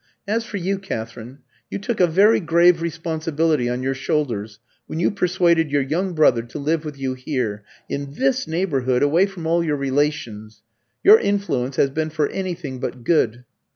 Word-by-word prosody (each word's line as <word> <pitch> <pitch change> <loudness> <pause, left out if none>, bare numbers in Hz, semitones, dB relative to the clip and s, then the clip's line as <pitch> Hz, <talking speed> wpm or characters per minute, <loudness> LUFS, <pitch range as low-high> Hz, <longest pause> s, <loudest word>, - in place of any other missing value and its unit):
As 225 +3 0
for 215 -2 -6
you, 190 +1 -1
Katherine, 115 - -7 0.3
you - - -3
took 210 +3 -3
a 180 - +5
very 200 +7 +4
grave 170 0 +4
responsibility 160 -4 -1
on 125 +1 -2
your 135 +1 0
shoulders 120 -7 -2 0.3
when 160 - -5
you 175 - +2
persuaded 175 -4 +2
your 145 -1 +2
young 175 +7 -1
brother 130 -7 +4
to 120 +1 -9
live 155 +2 -1
with 150 -2 -7
you 135 -1 -2
here, 125 -6 -3 0.2
in 140 0 -5
this 265 0 0
neighbourhood, 140 -7 0
away 165 +7 +3
from 190 -4 -9
all 170 +1 +2
your 150 -3 0
relations. 130 -7 -2 0.4
Your 425 +3 +8
influence 140 -11 -1
has 135 - +2
been 155 +2 -2
for 155 -1 0
anything 175 -8 -5
but 125 -1 -5
good." 120 -5 +1
155 Hz, 175 wpm, -21 LUFS, 130-175 Hz, 0.4 s, Your